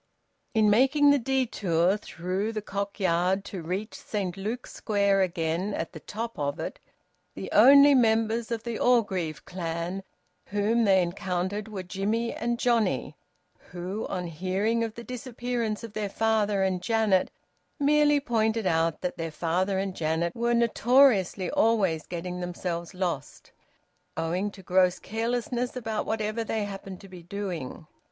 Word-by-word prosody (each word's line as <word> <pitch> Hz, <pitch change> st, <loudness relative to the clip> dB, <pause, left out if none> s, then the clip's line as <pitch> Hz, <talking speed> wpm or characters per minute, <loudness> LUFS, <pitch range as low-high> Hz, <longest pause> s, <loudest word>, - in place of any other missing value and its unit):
In 215 Hz, -1 st, +4 dB
making 270 Hz, +7 st, +5 dB
the 285 Hz, -, +4 dB
detour 205 Hz, -9 st, +1 dB
through 190 Hz, +2 st, -3 dB
the 215 Hz, -, -3 dB
Cock 200 Hz, 0 st, -4 dB
Yard 185 Hz, +1 st, +1 dB
to 195 Hz, -3 st, -6 dB
reach 190 Hz, +7 st, -4 dB
Saint 195 Hz, -5 st, -4 dB
Luke's 220 Hz, +6 st, -5 dB
Square 200 Hz, -2 st, +2 dB
again 175 Hz, +2 st, -1 dB
at 165 Hz, -, -4 dB
the 160 Hz, -, -8 dB
top 225 Hz, +2 st, -6 dB
of 145 Hz, +1 st, -2 dB
it, -, -, -5 dB, 0.6 s
the -, -, -6 dB
only 280 Hz, +5 st, +8 dB
members 225 Hz, -2 st, +2 dB
of 230 Hz, -2 st, -3 dB
the 235 Hz, -2 st, -4 dB
Orgreave 190 Hz, -10 st, +1 dB
clan 175 Hz, +1 st, -4 dB, 0.5 s
whom 215 Hz, +3 st, +1 dB
they 190 Hz, -2 st, +5 dB
encountered 185 Hz, +3 st, -3 dB
were 200 Hz, -4 st, -6 dB
Jimmie 210 Hz, +6 st, -1 dB
and 235 Hz, +1 st, -2 dB
Johnnie, 235 Hz, -5 st, +1 dB, 0.5 s
who, 180 Hz, +4 st, -4 dB
on 180 Hz, -1 st, -3 dB
hearing 190 Hz, +7 st, -1 dB
of 225 Hz, -1 st, -4 dB
the 235 Hz, -, -8 dB
disappearance 240 Hz, -3 st, -3 dB
of 225 Hz, -3 st, -8 dB
their 210 Hz, -2 st, -2 dB
father 210 Hz, -2 st, +1 dB
and 185 Hz, -2 st, 0 dB
Janet, 215 Hz, -2 st, +2 dB, 0.5 s
merely 295 Hz, 0 st, +4 dB
pointed 225 Hz, -4 st, 0 dB
out 165 Hz, -2 st, +1 dB
that 180 Hz, -, -3 dB
their 165 Hz, 0 st, -2 dB
father 180 Hz, +5 st, 0 dB
and 190 Hz, -1 st, -2 dB
Janet 165 Hz, +2 st, -1 dB
were 235 Hz, +1 st, +1 dB
notoriously 235 Hz, -5 st, +3 dB
always 195 Hz, -8 st, +2 dB
getting 180 Hz, +1 st, -5 dB
themselves 175 Hz, -1 st, -4 dB
lost, 175 Hz, -7 st, -4 dB, 0.7 s
owing 180 Hz, +5 st, -1 dB
to 195 Hz, -1 st, -13 dB
gross 180 Hz, 0 st, +3 dB
carelessness 240 Hz, +3 st, -2 dB
about 225 Hz, -3 st, -3 dB
whatever 220 Hz, +1 st, -1 dB
they 220 Hz, -1 st, -2 dB
happened 195 Hz, -2 st, -7 dB
to 195 Hz, -, -12 dB
be 185 Hz, -2 st, -11 dB
doing. 175 Hz, -5 st, -5 dB
200 Hz, 145 wpm, -27 LUFS, 180-230 Hz, 0.7 s, only